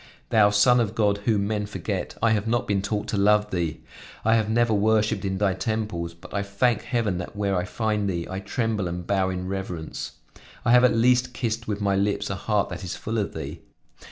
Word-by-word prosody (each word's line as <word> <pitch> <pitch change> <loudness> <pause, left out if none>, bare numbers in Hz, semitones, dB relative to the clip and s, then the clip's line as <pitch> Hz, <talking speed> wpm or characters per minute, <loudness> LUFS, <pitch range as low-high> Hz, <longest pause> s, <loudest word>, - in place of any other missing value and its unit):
Thou 105 -2 +5
Son 105 +5 +5
of 110 -2 0
God, 105 -2 +2
whom 105 -3 +2
men 105 0 -1
forget, 100 -2 -4
I 115 - +5
have 105 0 +1
not 120 +1 0
been 100 -1 +1
taught 105 +1 -2
to 105 - -1
love 105 +1 +3
Thee. 85 -4 -2 0.4
I 110 - +4
have 110 -2 +2
never 115 0 +2
worshiped 110 0 +2
in 95 -1 -1
Thy 100 -1 +2
temples, 95 -5 -3
but 85 - -13
I 100 - 0
thank 100 +5 +1
heaven 115 -7 -1
that 90 - -7
where 100 -1 0
I 90 0 0
find 105 -1 -1
Thee, 85 -2 -2
I 95 - -4
tremble 105 -1 -1
and 85 0 -5
bow 95 -1 +1
in 90 0 -4
reverence. 95 -4 -5 0.5
I 120 - +4
have 125 0 +7
at 125 -2 +5
least 125 +1 +3
kissed 115 -1 -2
with 105 -1 -2
my 100 -1 +2
lips 100 +1 0
a - - -1
heart 105 +1 0
that 90 0 -6
is 90 - -4
full 110 +1 -3
of 100 - -3
Thee. 80 -4 -6
105 Hz, 220 wpm, -25 LUFS, 95-110 Hz, 0.5 s, have